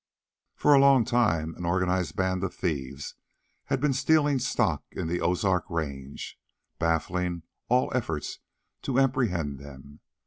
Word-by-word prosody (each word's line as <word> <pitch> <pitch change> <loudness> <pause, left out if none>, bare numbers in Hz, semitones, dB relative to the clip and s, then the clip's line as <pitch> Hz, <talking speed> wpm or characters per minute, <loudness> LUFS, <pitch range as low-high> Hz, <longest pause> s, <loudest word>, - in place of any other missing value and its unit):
For 150 - +4
a 140 - +7
long 135 -4 +6
time, 105 -10 +1
an - - -7
organized 90 -2 0
band 95 0 0
of 95 - -3
thieves 70 -5 -3 0.5
had - - 0
been 145 0 +2
stealing 145 0 +3
stock 125 0 0
in - - -4
the 90 +1 -1
Ozark 90 +1 +1
range, 70 -5 -5 0.4
baffling 85 +1 -1 0.3
all 125 +1 +2
efforts 80 -12 -3 0.4
to 135 -2 -2
apprehend 95 - 0
them. 70 +1 -12
90 Hz, 135 wpm, -27 LUFS, 80-125 Hz, 0.5 s, a